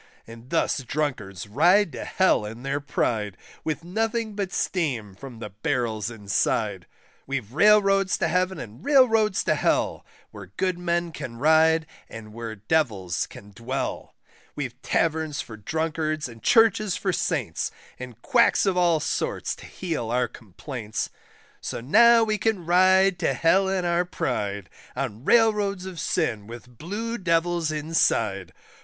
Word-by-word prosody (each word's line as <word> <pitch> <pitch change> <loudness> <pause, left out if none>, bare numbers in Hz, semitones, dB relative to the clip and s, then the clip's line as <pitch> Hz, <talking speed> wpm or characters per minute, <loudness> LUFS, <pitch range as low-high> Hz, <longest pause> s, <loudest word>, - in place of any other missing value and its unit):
And 115 +2 -13
thus - - +1
drunkards 125 -9 -3
ride 170 - +4
to - - -6
Hell 185 - +2
in 115 +3 -8
their 135 +1 -1
pride, 110 -8 -2 0.3
With 160 +1 -3
nothing 220 +4 -2
but 200 -2 -3
steam 130 - -2
from 125 +4 -10
the 110 -2 -8
barrels 110 -2 -2
inside. 105 -2 -1 0.4
We've 130 -5 -4
Railroads 195 +1 +4
to 170 - 0
Heaven, 185 +3 0
and 115 +3 -9
Railroads 225 -8 +4
to - - +2
Hell, - - 0 0.3
Where 100 -2 -10
good 185 -2 0
men 170 -1 -1
can 130 -6 -7
ride, 160 +3 +4 0.2
and 110 -1 -10
where 115 -1 -6
Devils 105 - -1
can 100 +1 -13
dwell; 115 +7 -4 0.4
We've 135 -4 -4
Taverns 160 -2 0
for 110 - -6
drunkards 155 +5 -2
and 115 -2 -13
Churches 215 -4 +3
for - - -1
Saints, - - -1 0.3
And 125 -3 -9
quacks 235 -3 +3
of 195 -2 +1
all 175 -3 +3
sorts - - -2
to - - -12
heal 160 -11 -4
our 125 +1 +1
complaints; 110 - -6 0.5
So - - -4
now 230 - +6
we 215 -1 0
can 215 -6 0
ride 185 +2 +4
to - - 0
Hell 190 +4 +3
in 190 -2 -1
our 175 +1 +1
pride, 100 - -3 0.3
On 105 +4 -4
Railroads 210 -5 +3
of 185 -3 -7
sin 115 - -1
with 120 +1 -12
blue 220 +7 -4
Devils 170 -2 +1
inside. 145 - 0
155 Hz, 145 wpm, -25 LUFS, 115-185 Hz, 0.5 s, now